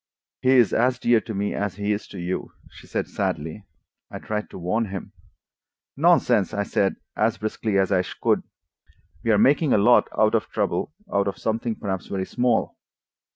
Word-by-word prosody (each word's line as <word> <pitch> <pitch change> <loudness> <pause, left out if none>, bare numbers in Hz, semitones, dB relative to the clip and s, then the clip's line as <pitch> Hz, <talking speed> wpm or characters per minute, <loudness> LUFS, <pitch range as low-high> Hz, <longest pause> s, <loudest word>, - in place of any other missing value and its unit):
"He 130 +1 +4
is 120 -3 +4
as 125 +1 +2
dear 120 -2 +3
to 110 +1 -6
me 100 +1 -1
as 100 -1 -2
he 105 +1 -1
is 105 0 -2
to - - -10
you," 90 +1 -4 0.2
she - - -15
said - - -2
sadly. 80 +7 -3 0.4
"I - - -7
tried 105 0 -4
to - - -10
warn 95 +6 0
him." 100 -1 -7 0.8
"Nonsense!" - - +3
I 100 - 0
said, 100 -1 0 0.2
as 115 +2 +1
briskly 110 -1 -2
as 95 0 +2
I 95 -2 +4 0.2
could. - - +2 0.8
"We 115 - -1
are 110 - +5
making 140 +6 +4
a - - +5
lot 120 +4 +5
of 110 +1 +2
trouble 100 - -1 0.2
out 100 0 +2
of 100 - -3
something 115 +1 -2
perhaps 95 -4 -4
very 95 -1 -3
small. 125 +3 0
105 Hz, 180 wpm, -24 LUFS, 100-115 Hz, 0.8 s, are